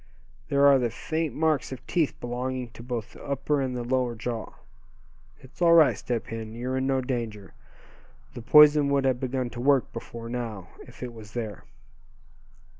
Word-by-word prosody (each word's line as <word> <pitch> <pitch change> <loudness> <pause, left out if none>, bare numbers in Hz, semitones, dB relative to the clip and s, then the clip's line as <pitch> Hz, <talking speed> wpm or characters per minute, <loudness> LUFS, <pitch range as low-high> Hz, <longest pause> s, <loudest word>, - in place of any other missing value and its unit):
There 140 0 +4
are 140 -1 +7
the 120 -2 0
faint 160 +6 -3
marks 155 -5 +1
of 130 - -8
teeth 165 -5 0
belonging 125 0 -4
to 115 - -12
both 120 -2 -5
the - - -13
upper 140 +1 -1
and 130 -2 -2
the 120 - -3
lower 125 -1 0
jaw. 115 0 -4 0.9
It's 130 +6 -17
all 170 -1 +6
right, 160 -3 +6
Step 120 -2 -3
Hen; 110 -1 -7
you're 125 +2 -3
in 130 0 0
no 135 -1 +1
danger. 115 -6 -4 0.8
The - - -7
poison 150 +3 +7
would 140 -1 +2
have 130 -2 +1
begun 130 -1 -2
to 120 - -6
work 140 0 +2
before 115 0 -7
now, 115 -6 -5 0.2
if - - -11
it 125 -1 -6
was 110 -1 -12
there." 110 -5 -5
125 Hz, 180 wpm, -26 LUFS, 115-140 Hz, 0.9 s, are